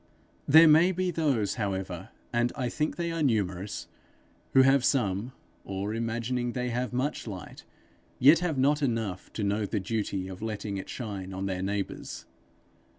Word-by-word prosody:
There 160 +3 +9
may 160 +4 +6
be 185 0 -1
those, 140 - 0
however, 95 -3 -3 0.2
and 120 +1 +2
I 130 -4 -1
think 150 +5 -1
they 170 -1 -2
are 165 -1 -2
numerous, 100 -7 -1 0.7
who, 130 - +7
having 135 +1 +5
some, 115 -3 +1 0.3
or 100 +2 -3
imagining 120 +2 -2
they 125 -1 -2
have 125 +2 -2
much 130 +1 -2
light, 95 -5 -8 0.5
yet 145 +6 +7
have 175 -5 -1
not 145 +3 +3
enough 115 -8 -2
to 110 - -3
know 100 +1 0
the 105 - -1
duty 100 -2 -2
of 95 0 -8
letting 105 -2 -3
it 95 - -7
shine 95 -5 -5
on 95 +1 -3
their 95 -1 -2
neighbours. 100 +1 -4
115 Hz, 160 wpm, -28 LUFS, 100-135 Hz, 0.7 s, There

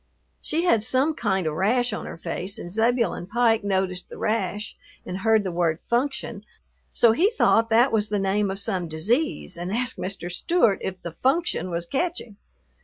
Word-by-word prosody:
She 330 +2 -1
had 290 -12 +3
some 260 +7 +1
kind 195 - -1
of 155 - -1
rash 225 +8 +1
on - - -5
her - - -7
face 180 +5 -3
and 175 -5 -7
Zebulon 230 -3 0
Pike 225 0 +2
noticed 190 -2 -1
the - - -10
rash 210 -1 -2 0.3
and 185 +1 -5
heard 220 +1 +3
the 190 - -3
word 170 -2 +1
"function," 255 +4 -1 0.5
so 235 - +4
he 345 - +3
thought 230 - +3
that 235 +4 +4
was 215 -1 0
the 210 - 0
name 195 +1 +1
of 190 - -3
some 185 -3 -1
disease 190 - 0
and 175 +2 -5
asked 245 +3 -1
Mr. 185 -2 -5
Stewart 235 - +2
if 185 -1 -4
the 170 - -5
"function" 265 - +1
was 170 0 -3
"catching." 275 - -3
210 Hz, 180 wpm, -24 LUFS, 185-245 Hz, 0.5 s, so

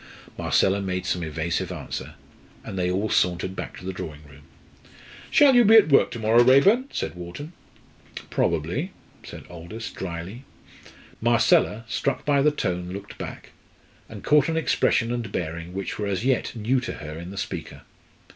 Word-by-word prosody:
Marcella 100 +1 +2
made 90 -1 -3
some 90 - -1
evasive 80 +1 -2
answer, - - -6 0.5
and - - -7
they 90 -1 0
all 95 +4 0
sauntered 90 -1 +1
back - - -6
to 90 - -11
the 95 - -3
drawing 75 -4 -7
room. 75 -1 -16 0.9
"Shall 285 -2 +6
you 245 -1 +7
be 220 +1 +6
at 220 -8 +7
work 140 - +5
to - - -6
morrow, 115 +1 +4
Raeburn?" 190 - +5
said - - -3
Wharton. 90 - -8 0.8
"Probably," 90 - -1 0.3
said - - -10
Aldous 90 +7 -8
drily. 95 +7 -6 0.8
Marcella, 115 -1 +3
struck 110 - -2
by 145 -1 +3
the 150 - +5
tone, 90 -11 -2
looked 100 +2 -8
back, - - -8 0.6
and - - -10
caught 150 0 +4
an 165 - 0
expression 120 -6 +2
and 120 -4 -4
bearing 85 -1 -4
which 95 +2 -5
were 105 - -1
as 95 +2 -2
yet 130 -2 0
new 120 +4 +1
to 125 - -5
her 75 +1 -8
in 85 +1 -8
the 100 - -9
speaker. - - -6
100 Hz, 165 wpm, -24 LUFS, 90-130 Hz, 0.9 s, you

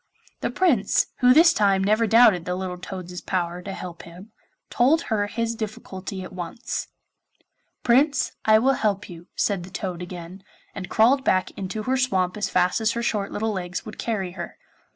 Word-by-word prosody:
The - - -1
Prince, 265 - +2
who 250 0 +6
this 325 +6 +7
time 195 -2 +2
never 215 +3 +2
doubted 215 -6 +5
the 180 - -2
little 185 -1 -4
toad's 180 -1 -7
power 175 -1 -2
to 195 - -6
help 180 -3 -7
him, 180 +6 -13 0.4
told 295 +7 +3
her 205 -1 +1
his 230 +2 -2
difficulty 195 -3 -6
at - - -10
once. 180 +6 -5 1.0
'Prince, 270 +4 +3
I 215 0 +6
will 260 +5 +3
help 205 -5 -1
you,' 170 +1 -11
said 200 -4 0
the 180 - -9
toad 185 -2 -5
again, 180 +1 -8 0.3
and 185 -2 -7
crawled 255 +5 +4
back 185 -7 +1
into 195 +3 -5
her 260 +3 0
swamp 190 -8 +1
as 205 -2 -2
fast 180 +4 +2
as 220 0 +2
her 235 - -3
short 205 -4 -1
little 220 +1 -1
legs 180 -3 -4
would 215 - -9
carry 195 -6 -2
her. 175 -1 -8
200 Hz, 180 wpm, -24 LUFS, 180-230 Hz, 1.0 s, this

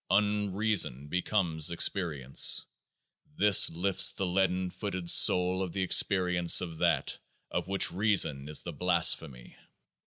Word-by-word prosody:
Unreason 105 - -1
becomes 90 -3 -2
Experience. 80 -6 0 0.7
This 105 -2 +5
lifts 90 +3 +1
the 95 - -5
leaden 95 0 -2
footed 95 -4 -5
soul 90 +1 +3
to - - -12
the 95 +2 -4
Ex 95 - +4
perience 90 -3 +1
of 85 -3 -7
THAT - - -2 0.3
of - - -5
which 95 0 0
Reason 90 -8 0
is 75 - +3
the - - -8
blasphemy. 60 -3 -1
90 Hz, 125 wpm, -28 LUFS, 85-100 Hz, 0.7 s, This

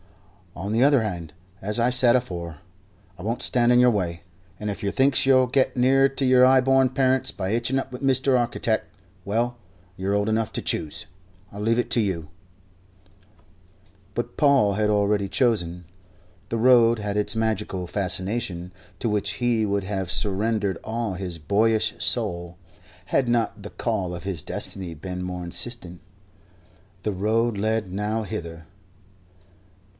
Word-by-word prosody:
"On 95 +4 -4
the 115 +3 +3
other 140 -4 +4
hand, 85 -7 -4 0.3
as 105 +3 -2
I 120 +2 +3
said 125 -1 +5
afore, 85 -10 -3 0.6
I - - -10
won't 115 +3 -2
stand 120 -1 +4
in 125 - +5
yer 125 0 +6
way, 90 -7 -2 0.4
and 105 - -3
if 100 - -5
yer 100 - 0
thinks 135 +3 +3
you'll 130 -1 +5
get 130 +1 +1
nearer 135 +2 +4
to 135 0 -2
your 130 0 +5
'igh 130 +1 +6
born 135 -1 +4
parents 130 0 +1
by 95 0 -3
hitching 120 +4 0
up 135 - -6
with 125 - -8
Mr. 135 -1 +3
Architect, 120 -2 -1 0.3
well 120 +5 -1 0.4
you're 95 +2 -1
old 105 +1 +1
enough 110 0 0
to - - -3
choose. 80 +3 -2 0.5
I 100 - -8
leave 115 +3 +1
it 120 -1 -1
to 120 - +3
you." 85 -7 -2 1.8
But 120 +3 -4
Paul 135 -9 +4
had 105 +1 +1
already 100 -1 +1
chosen. 90 -8 +1 0.6
The 115 - -1
Road 120 -1 +5
had 105 -1 -3
its 105 +2 -1
magical 105 -5 -1
fascination, 95 0 -3 0.3
to 120 - -1
which 105 -1 0
he 120 -3 +1
would 100 -1 -1
have 95 -3 -3
surrendered 100 -1 0
all 115 -2 -3
his 90 -2 -5
boyish 105 +7 +1
soul, 85 0 -2 0.5
had 125 +6 +1
not 115 -3 0
the 105 - -7
call 100 -7 -2
of 85 - -8
his 95 -5 -4
destiny 90 -4 -5
been 90 +3 -6
more 90 -1 -5
insistent. 90 -1 -6 1.0
The 105 - -1
Road 110 +3 0
led 110 -1 -1
nowhither. 100 -6 -4
105 Hz, 155 wpm, -24 LUFS, 95-120 Hz, 1.8 s, yer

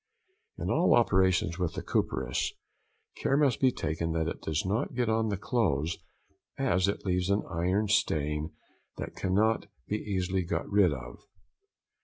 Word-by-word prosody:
In - - -2
all - - +4
operations 95 -4 +2
with 90 -3 -1
the - - -4
copperas 65 -1 -1 0.6
care 135 - +1
must 145 -4 +3
be 130 -1 +5
taken 80 -3 -2
that 80 -1 0
it - - -4
does 80 +2 -1
not 105 +6 -1
get 120 -2 +1
on 110 0 +2
the 100 - -1
clothes, 90 - 0 0.6
as 90 +2 +2
it 100 - -2
leaves 90 0 0
an 100 +1 +2
iron 90 +5 0
stain 75 -6 0 0.5
that - - -6
cannot 105 +4 +1 0.2
be 105 - 0
easily 95 -3 -1
got 85 -1 -2
rid 100 -4 +4
of. - - -7
95 Hz, 155 wpm, -29 LUFS, 80-105 Hz, 0.6 s, be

